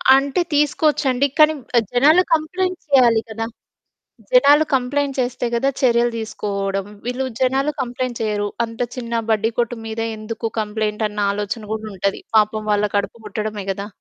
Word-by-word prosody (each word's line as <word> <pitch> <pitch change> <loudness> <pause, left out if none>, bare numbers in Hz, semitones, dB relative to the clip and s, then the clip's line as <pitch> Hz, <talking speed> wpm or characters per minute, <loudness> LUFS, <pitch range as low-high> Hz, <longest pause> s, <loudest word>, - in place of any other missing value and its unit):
అంటే, 275 +5 +1
తీసుకోవచ్చండి. 285 -2 +2
కానీ 310 0 +7 0.2
ఆహ్, 225 - +3
జనాలు 300 +8 +6
కంప్లెయింట్స్ 365 +4 -1
చేయాలి 240 -5 +5
కదా! 225 +1 -3 0.9
జనాలు 310 -12 +6
కంప్లెయింట్ 270 +2 0
చేస్తే 245 0 -2
కదా, 270 +4 +2
చర్యలు 240 -1 +3
తీసుకోవడం, 200 -3 -3 0.2
వీళ్ళు 250 +2 -2 0.2
జనాలు 270 +3 +2
కంప్లెయింట్ 245 -1 -3
చెయ్యరు. 210 -2 -1 0.2
అంత 230 0 -12 0.2
చిన్న 235 -2 -4 0.2
బడ్డి 220 +1 +2
కొట్టు 240 0 0
మీద 220 0 -5 0.2
ఎందుకు 225 +1 -4
కంప్లెయింటన్న 210 0 -2
ఆలోచన 210 +2 -4
కూడా 220 0 -5
ఉంటది. 195 +1 -1 0.2
పాపం 215 0 +2
వాళ్ళ 210 0 +2
కడుపు 205 +3 -2
గొట్టడమే 210 -1 -4
గదా! 200 +1 -5
235 Hz, 140 wpm, -20 LUFS, 215-270 Hz, 0.9 s, కానీ